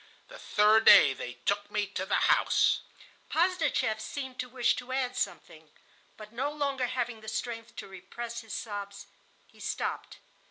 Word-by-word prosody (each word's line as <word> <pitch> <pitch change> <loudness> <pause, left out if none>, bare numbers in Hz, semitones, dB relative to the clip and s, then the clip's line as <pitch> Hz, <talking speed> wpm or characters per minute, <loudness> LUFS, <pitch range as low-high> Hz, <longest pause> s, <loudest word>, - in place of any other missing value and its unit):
The - - -11
third 215 +2 +4
day 140 - +9
they 125 -1 -6
took 205 0 0
me 210 0 0
to 190 -1 -5
the - - +2
house."... - - +3 0.5
Posdnicheff 330 -10 +1
seemed 260 +3 -6
to 250 - -3
wish 245 -1 +2
to 250 +1 -7
add 260 -1 -1
something, - - -5 0.5
but, 215 0 -12
no 265 +5 -1
longer 280 -4 -1
having 245 -3 -3
the 220 - -13
strength 230 0 -5
to - - -7
repress 230 +5 -7
his 225 -2 -7
sobs, 200 -2 -6 0.4
he - - -23
stopped. - - -4
230 Hz, 160 wpm, -29 LUFS, 205-255 Hz, 0.5 s, day